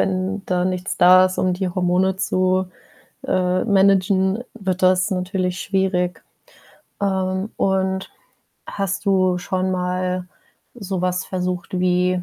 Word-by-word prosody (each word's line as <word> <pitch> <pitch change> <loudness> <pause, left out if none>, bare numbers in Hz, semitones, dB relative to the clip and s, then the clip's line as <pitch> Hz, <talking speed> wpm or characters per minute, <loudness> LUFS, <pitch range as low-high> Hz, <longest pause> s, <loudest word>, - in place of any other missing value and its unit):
wenn 190 +1 -1
da 180 -1 0
nichts 185 0 -2
da 185 +1 +7
ist, 185 - -6
um 185 - +1
die 185 +1 -2
Hormone 185 +1 +1
zu, 185 -1 +1 0.6
äh 185 0 +1
managen, 195 0 +2
wird 190 -4 -3
das 185 +2 +3
natürlich 180 -1 -2
schwierig. 185 -2 -1 0.8
Ähm, 190 0 -1
und 190 0 0 0.6
hast 195 +1 -3
du 185 -2 +2
schon 185 +1 -2
mal 180 0 -2 0.5
so 195 -6 -4
was 180 0 -1
versucht 180 -1 -3
wie 180 0 +1
185 Hz, 125 wpm, -21 LUFS, 180-190 Hz, 0.8 s, da